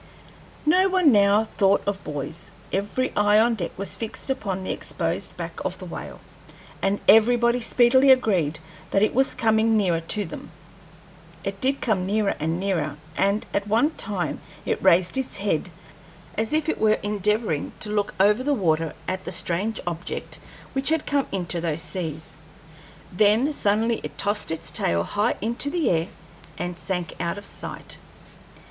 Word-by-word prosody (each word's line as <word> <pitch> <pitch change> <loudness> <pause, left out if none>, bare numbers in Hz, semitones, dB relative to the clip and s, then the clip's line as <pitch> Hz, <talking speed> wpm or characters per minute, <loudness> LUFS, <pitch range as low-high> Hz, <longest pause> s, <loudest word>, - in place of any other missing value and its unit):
No 370 +5 +4
one 365 -6 +4
now 205 0 +5
thought 200 -2 +2
of 200 -1 -2
buoys. 150 +3 -5 0.2
Every 205 +7 -1
eye 205 0 +4
on 235 +2 +4
deck 180 -7 -2
was 200 +1 -2
fixed 225 +4 -4
upon 195 -8 -3
the - - -2
exposed - - -3
back - - -6
of - - -3
the - - -9
whale, - - -8 0.6
and 195 +1 +1
everybody 235 +2 +5
speedily 250 +3 +4
agreed 190 - +3 0.3
that 195 - +2
it 215 - +2
was 265 +2 +2
coming 220 0 +3
nearer 180 -5 +2
to 200 +5 0
them. 165 - -9 0.9
It - - -4
did 270 +1 +1
come 190 -6 0
nearer 210 0 +1
and 160 +3 -1
nearer, 180 -7 -1 0.2
and 200 +2 +1
at 200 0 -1
one 230 +9 +3
time 195 - -2 0.2
it - - -1
raised 185 +5 +4
its 260 -5 -3
head 195 -4 -1 0.7
as 220 +1 -1
if 310 0 +1
it 320 - -1
were 215 0 +4
endeavoring 210 -4 0
to 210 - -3
look 205 -4 -1
over 210 +5 +4
the 285 +2 +1
water 165 - 0
at 185 0 -2
the - - -4
strange 185 +5 -2
object 175 0 -4 0.3
which 270 +1 0
had 320 -1 +1
come 285 -1 0
into 175 -3 -2
those 165 -1 -1
seas. 160 -6 -5 0.7
Then 215 +9 +3
suddenly 225 -1 +1
it 150 -1 -7
tossed 205 +3 0
its 165 +1 -3
tail 85 0 +1
high 205 - 0
into 235 +6 +1
the 330 0 +1
air 165 0 +1 0.5
and 175 0 -3
sank 180 -1 -3
out 170 +2 -2
of 205 - -7
sight. - - -6
205 Hz, 165 wpm, -24 LUFS, 180-230 Hz, 0.9 s, now